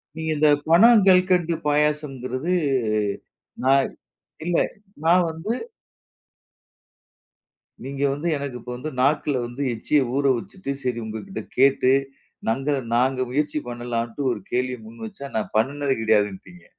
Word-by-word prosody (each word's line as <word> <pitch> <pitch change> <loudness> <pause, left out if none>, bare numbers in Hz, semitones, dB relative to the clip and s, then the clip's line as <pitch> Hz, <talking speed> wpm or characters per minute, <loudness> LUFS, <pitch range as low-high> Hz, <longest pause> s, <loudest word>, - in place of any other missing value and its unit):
நீங்க 160 0 -4
இந்த 150 0 +4 0.2
பண 170 +5 +6 0.2
கல்கண்டு 180 -2 +4
பாயாசங்கிறது, 150 0 0 1.1
நான், 135 0 +4 0.6
இல்ல 175 -1 +1 0.5
நான் 175 +2 +5
வந்து, 170 +8 -3 2.3
நீங்க 140 +1 -4
வந்து, 150 +5 -3
எனக்கு 140 -3 -5
இப்ப 125 +2 -8
வந்து 155 +5 -5
நாக்குல 145 0 +2
வந்து 120 +4 -7
எச்சிய 145 +5 +1
ஊற 140 - +1
வச்சுட்டு, 160 +4 -6
சரி 125 -2 -1
உங்ககிட்ட 110 - -6 0.2
கேட்டு 130 -1 +4 0.6
நங்க 135 +5 0 0.2
நாங்க 130 +2 +2
முயற்சி 150 +3 0
பண்ணலாம்ட்டு 120 +1 -4
ஒரு 115 - -3
கேள்விய 125 0 -1
முன்வச்சா, 140 - -9
நான் 110 - -2
பண்ணினது 140 +4 +1
கிடையாதுன்டிங்க. 110 - 0
140 Hz, 115 wpm, -23 LUFS, 125-160 Hz, 2.3 s, பண